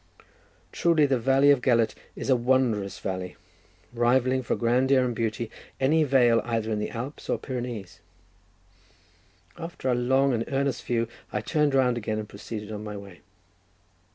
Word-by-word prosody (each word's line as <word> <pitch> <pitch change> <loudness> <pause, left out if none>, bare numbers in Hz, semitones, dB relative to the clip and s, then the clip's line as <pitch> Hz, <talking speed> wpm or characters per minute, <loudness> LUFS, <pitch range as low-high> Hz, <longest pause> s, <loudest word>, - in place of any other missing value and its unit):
Truly, 165 -3 +3
the 135 -3 +1
valley 135 +4 +4
of 140 -3 +3
Gelert 115 -3 +2 0.2
is - - -2
a - - +6
wondrous 120 -6 +1
valley—rivalling 120 +7 -2
for 120 - -1
grandeur 130 +2 +3
and 120 -2 -2
beauty 115 0 -2 0.3
any 155 +4 +3
vale 125 -5 +4
either 115 -2 -2
in 105 - 0
the 105 - -2
Alps 125 +5 -7
or - - +1
Pyrenees. 120 -7 -6 1.6
After 165 -5 -4
a - - +3
long 130 +2 +2
and 115 -1 0
earnest 135 -2 -1
view, 115 -1 0 0.2
I 105 - -2
turned 150 +3 +1
round 125 -2 +3
again, 110 -1 -3
and 105 -1 -4
proceeded 105 +1 -7
on 105 0 -5
my 105 -1 -6
way. 100 -3 -12
120 Hz, 155 wpm, -26 LUFS, 110-130 Hz, 1.6 s, a